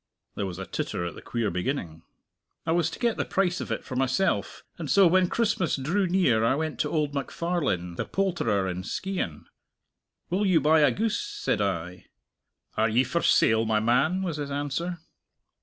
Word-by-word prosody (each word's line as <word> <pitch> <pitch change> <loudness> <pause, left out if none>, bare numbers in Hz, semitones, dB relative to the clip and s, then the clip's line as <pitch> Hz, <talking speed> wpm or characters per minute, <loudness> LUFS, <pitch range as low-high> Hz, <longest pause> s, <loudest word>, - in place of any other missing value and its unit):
There 100 - -3
was 90 -2 -6
a 95 - -5
titter 85 - -3
at 85 - -4
the - - -11
queer 115 -3 -2
beginning. 90 - -3 0.6
"I 160 - 0
was 165 -1 +2
to - - -8
get 235 -2 0
the - - +1
price 180 -2 0
of - - -5
it - - -2
for 130 - -7
myself, 135 +9 0 0.2
and - - -5
so 200 -2 +6
when 180 +1 +4
Christmas 210 -7 +1
drew 170 +9 0
near 170 -12 +3
I 115 +4 +3
went 155 +1 -3
to - - 0
old 150 -3 0
MacFarlane, 140 - -2
the - - -2
poulterer 175 - 0
in 90 0 -3
Skeighan. 180 - -4 0.9
'Will 200 +3 +1
you 180 -4 +4
buy 155 +2 +4
a 145 -2 +5
goose?' 220 - -1
said 415 - -2
I. 90 -2 -3 0.7
'Are 110 +1 +2
ye 120 +4 +3
for 140 +7 -1
sale, 110 0 +4
my 110 -1 +1
man?' 135 - +2
was 170 -5 -2
his 145 -1 -4
answer." 145 +5 -2
145 Hz, 190 wpm, -27 LUFS, 110-180 Hz, 0.9 s, so